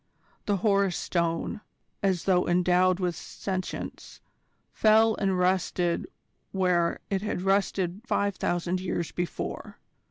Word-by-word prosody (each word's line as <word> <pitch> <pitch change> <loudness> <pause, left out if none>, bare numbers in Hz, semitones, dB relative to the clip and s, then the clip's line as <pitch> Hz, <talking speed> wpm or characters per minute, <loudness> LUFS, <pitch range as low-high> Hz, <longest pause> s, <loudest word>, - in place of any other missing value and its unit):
The 205 -1 +2
Horus 200 -3 +3
Stone, 170 +3 -1 0.4
as 190 -4 +1
though 180 -2 +2
endowed 180 +1 +3
with 180 -2 -1
sentience, 185 -2 -5 0.5
fell 220 +1 +5
and 195 -2 +1
rested 180 - +1 0.4
where 180 -3 +1
it 195 -1 +1
had 210 -3 -3
rested 195 -1 +1
five 200 -1 +1
thousand 175 +1 -1
years 175 -2 -2
before. 175 -2 -4
185 Hz, 115 wpm, -27 LUFS, 175-195 Hz, 0.5 s, fell